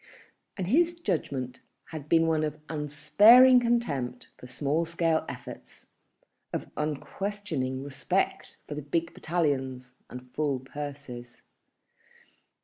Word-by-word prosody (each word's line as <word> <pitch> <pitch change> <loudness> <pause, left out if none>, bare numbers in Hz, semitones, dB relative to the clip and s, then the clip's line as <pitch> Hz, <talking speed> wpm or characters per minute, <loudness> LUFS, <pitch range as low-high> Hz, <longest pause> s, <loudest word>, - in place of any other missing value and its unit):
And 190 - -2
his 340 - +2
judgment 140 - -2 0.3
had 150 -2 -8
been 165 0 +5
one 160 -1 +2
of 155 0 -3
unsparing 205 - +6
contempt 145 - -1
for 125 - -12
small 145 +6 0
scale 165 -1 +1
efforts, 125 -2 -10 0.6
of - - -4
unquestioning 150 -3 -3
respect 140 -1 -2
for - - -5
the 150 - -4
big 165 +4 -2
battalions 135 -7 -1 0.2
and 125 0 -10
full 145 -4 0
purses. 135 -3 -8
150 Hz, 110 wpm, -28 LUFS, 130-170 Hz, 0.6 s, unsparing